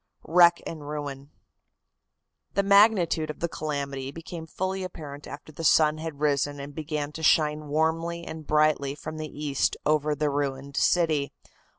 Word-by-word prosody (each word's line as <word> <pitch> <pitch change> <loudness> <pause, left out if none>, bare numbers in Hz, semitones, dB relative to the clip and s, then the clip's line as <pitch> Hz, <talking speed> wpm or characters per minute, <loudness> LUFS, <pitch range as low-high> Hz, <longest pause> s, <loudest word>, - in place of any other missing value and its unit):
WRECK 170 +1 +5
AND 155 -3 -7
RUIN. 145 -2 -5 1.3
The 200 - +3
magnitude 200 -6 +4
of 150 - -6
the 170 - 0
calamity 140 -4 -4
became 165 +2 -8
fully 190 +3 -3
apparent 150 -5 -8
after 145 +2 -9
the 160 +2 -8
sun 155 0 +4
had 160 -3 -6
risen 145 -1 0
and 140 +1 -7
began 150 -1 -3
to 160 - -8
shine 150 -1 +3
warmly 165 +3 0
and 160 -1 -8
brightly 150 -2 +2
from 155 +1 -7
the 155 -1 -5
east 145 -2 -1
over 150 0 +2
the 150 0 0
ruined 140 -1 -3
city. 155 -5 +2
155 Hz, 155 wpm, -26 LUFS, 145-165 Hz, 1.3 s, WRECK